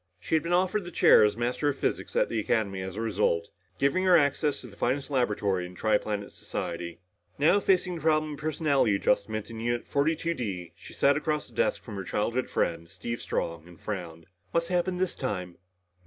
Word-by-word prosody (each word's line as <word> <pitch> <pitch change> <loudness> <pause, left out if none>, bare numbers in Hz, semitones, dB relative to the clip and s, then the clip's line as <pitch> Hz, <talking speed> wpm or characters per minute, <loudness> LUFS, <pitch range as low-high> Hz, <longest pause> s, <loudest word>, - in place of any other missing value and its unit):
She 90 - -6
had 160 - +4
been 170 +3 -4
offered 185 +3 +2
the 175 - -7
chair 170 - +6
as 105 +1 +2
Master 125 +5 0
of 140 - -2
Physics - - -2
at - - +3
the 115 - -1
Academy 100 -3 0
as 95 0 -5
a 110 - -3
result, 105 -6 +1 0.3
giving 140 +7 +2
her 180 -2 +7
access 145 0 +1
to - - -11
the 100 - -14
finest 135 +6 -1
laboratory 105 -8 +1
in 90 - -13
the - - -14
tri 110 -1 +3
planet 105 -1 -4
society. 85 0 -5 0.4
Now 160 +8 +4
facing 185 -2 +2
the - - -9
problem 155 -1 +2
of 145 - -9
personality 150 -7 +2
adjustment 105 +2 0
in 115 - -7
Unit 120 +1 -1
42 160 +4 0
D, 95 - -5
she 95 +1 -13
sat 140 +1 +3
across 150 -1 -1
the - - -19
desk - - +1
from 105 -4 -7
her 95 - -4
childhood 115 +7 -1
friend, 85 0 -1
Steve 115 +6 -5
Strong, 85 0 -3
and 85 -2 -15
frowned. 85 -6 -6 0.3
"What's 170 +1 0
happened 180 0 0
this 185 -1 0
time?" 90 - -4
120 Hz, 210 wpm, -28 LUFS, 100-155 Hz, 0.4 s, her